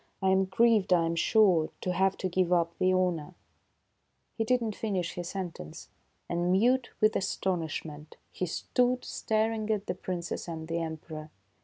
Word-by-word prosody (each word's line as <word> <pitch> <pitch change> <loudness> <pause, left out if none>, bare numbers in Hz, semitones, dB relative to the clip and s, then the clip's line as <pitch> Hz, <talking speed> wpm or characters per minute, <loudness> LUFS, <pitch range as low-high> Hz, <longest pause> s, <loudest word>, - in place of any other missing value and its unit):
I 190 - +1
am 190 0 +3
grieved, 210 0 +3
I 170 -2 +4
am 165 0 -1
sure, 180 -3 +4
to 180 - -1
have 190 +2 +2
to 185 - -2
give 185 0 0
up 170 -1 +2
the 185 - +3
honor 180 -3 0 0.4
" - - -47
— - - -47
He 225 - 0
did 250 +3 +2
not 225 -3 -2
finish 190 -6 -2
his 175 -1 -5
sentence, 175 - -6 0.4
and 175 +1 0
mute 240 +6 +3
with 215 0 +3
astonish 185 -5 -1
ment 150 0 -10
he 185 - -3
stood 250 +8 0
staring 220 0 -1
at 210 -2 0
the - - -2
Princess 175 -1 -4
and 160 -1 -6
the 165 +1 -1
Emperor. 160 -1 -6
185 Hz, 180 wpm, -29 LUFS, 170-215 Hz, 0.4 s, I